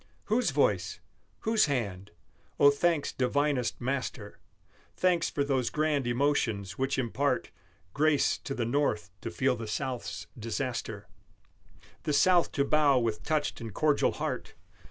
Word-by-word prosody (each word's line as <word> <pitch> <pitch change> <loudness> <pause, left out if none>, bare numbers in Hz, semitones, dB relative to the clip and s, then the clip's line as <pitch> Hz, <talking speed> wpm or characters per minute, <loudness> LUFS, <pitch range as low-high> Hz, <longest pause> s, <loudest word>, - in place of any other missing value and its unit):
Whose 225 -1 +1
voice? 100 - +1 0.4
Whose 220 0 +3
hand? 100 -8 -2 0.5
Oh, 145 0 +8
thanks 155 +1 +1
divinest 135 0 0
Master, 130 +1 -4 0.6
Thanks 180 -2 +2
for 140 - -1
those 135 -4 0
grand 150 -4 0
emotions 120 -6 0
which 135 +1 -1
impart 135 +3 0 0.4
Grace 150 0 +2
to 135 - -5
the 120 - -1
North 115 -8 0
to - - -4
feel 130 +8 +1
the 115 -1 -6
South's 130 +2 -4
disaster, 115 -2 -4 0.9
The 150 - -1
South 175 +4 +4
to 140 - +1
bow 145 -2 +4
with 115 -3 0
touched 150 -5 -1
and 110 -4 -7
cordial 150 -2 +2
heart! - - -4
135 Hz, 135 wpm, -29 LUFS, 115-145 Hz, 0.9 s, Oh